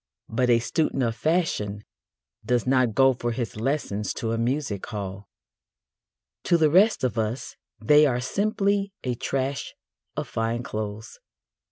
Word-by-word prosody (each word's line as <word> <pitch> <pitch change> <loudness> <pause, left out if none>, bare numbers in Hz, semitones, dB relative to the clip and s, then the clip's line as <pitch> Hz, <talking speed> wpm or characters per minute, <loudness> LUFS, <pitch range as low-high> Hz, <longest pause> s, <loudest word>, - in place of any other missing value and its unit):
But 125 +2 +1
a 120 - +6
student 135 +3 0
of 115 -1 0
fashion 115 - 0 0.6
does 120 +2 +1
not 130 -4 +2
go 135 +1 +5
for 120 -1 -3
his 115 -2 -4
lessons 110 -4 -2
to 115 - -2
a 115 - 0
music 120 -4 -1
hall. 100 -3 -6 1.2
To 170 - +4
the 155 -2 +3
rest 200 +3 +4
of 120 -3 0
us 110 +4 -3 0.2
they 150 0 +6
are 125 -2 0
simply 200 - 0
a 125 - -1
trash 135 +3 -3 0.4
of - - -2
fine 115 +2 -2
clothes. 110 0 -6
125 Hz, 145 wpm, -25 LUFS, 110-150 Hz, 1.2 s, a